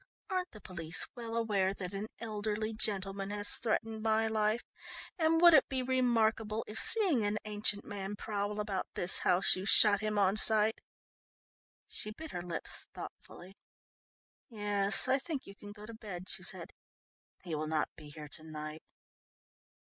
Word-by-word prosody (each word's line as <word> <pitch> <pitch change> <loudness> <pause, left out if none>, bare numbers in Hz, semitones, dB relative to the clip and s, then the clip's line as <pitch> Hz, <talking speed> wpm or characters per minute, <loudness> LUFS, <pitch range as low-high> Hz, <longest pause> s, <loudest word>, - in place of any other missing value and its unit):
"Aren't 365 -1 -1
the 215 - -13
police 170 -3 +1
well 230 -2 -6
aware 200 -4 0
that 185 -1 -6
an 200 +2 -4
elderly 215 0 -3
gentleman 195 -2 0
has 205 0 -1
threatened 225 -1 -2
my 220 0 +2
life, 220 +1 0 0.6
and 325 0 +3
would 345 0 +8
it - - +5
be 260 -1 -1
remarkable 230 -4 +1
if 215 +1 -5
seeing 370 - +3
an 205 +1 0
ancient 205 -1 0
man 200 -1 -5
prowl 205 0 -3
about 205 -3 -2
this 180 - +3
house 180 +2 +5
you 185 - -5
shot 205 -2 +7
him 215 0 -2
on 200 0 +3
sight?" 220 0 +4 1.1
She 215 - -4
bit 310 +9 -8
her 175 - -4
lips 175 -1 -6
thoughtfully. 185 +2 -10 1.0
"Yes, 205 -1 +1
I 265 +1 +3
think 285 -1 -5
you 195 - -12
can 205 0 -11
go 210 0 -11
to 230 - -9
bed," 200 -5 -8
she - - -6
said. - - -3 0.7
"He 175 -3 -6
will 155 0 -2
not 155 -1 0
be 150 -2 -12
here 150 0 -9
to 155 - -12
night. 155 0 -7
210 Hz, 165 wpm, -32 LUFS, 195-225 Hz, 1.1 s, would